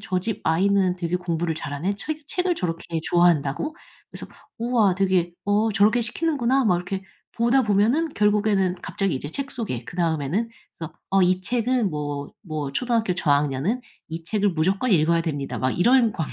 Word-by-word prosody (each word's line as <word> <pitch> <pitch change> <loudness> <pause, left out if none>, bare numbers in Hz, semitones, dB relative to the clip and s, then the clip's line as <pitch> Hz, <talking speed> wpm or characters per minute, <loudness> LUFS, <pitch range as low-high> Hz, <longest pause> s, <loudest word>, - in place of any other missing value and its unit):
저 185 - -1
집 225 +2 -3
아이는 185 +2 +2
되게 175 -1 -1
공부를 170 -2 -2
잘하네. 160 +5 -3
책 300 +7 -6
책을 360 0 0
저렇게 170 - -3
좋아한다고?' 175 - +2 0.4
그래서 - - -4 0.3
'우와 230 -5 +2
되게 185 -2 +1
어 210 +2 +2
저렇게 210 +4 +4
시키는구나.' 265 0 +1
막 180 - +4
이렇게 190 +2 -4 0.3
보다 235 +3 +3
보면은 225 +9 +2
결국에는 205 -4 +2
갑자기 185 +1 -1
이제 140 +2 -4
책 275 - -3
소개 130 - -4
그다음에는 170 - -1 0.3
그래서 160 -1 -6 0.2
"어 195 0 +4
이 185 +1 +3
책은 240 +2 0
뭐 145 -2 -4
뭐 155 -6 -4
초등학교 230 - 0
저학년은 145 - +1 0.3
이 165 0 -6
책을 205 +3 +1
무조건 190 +8 0
읽어야 165 -2 +3
됩니다." 145 -4 -3
막 130 0 +1
이런 235 +4 +4
광고 160 -8 -4
190 Hz, 370 characters per minute, -24 LUFS, 165-225 Hz, 0.4 s, 저렇게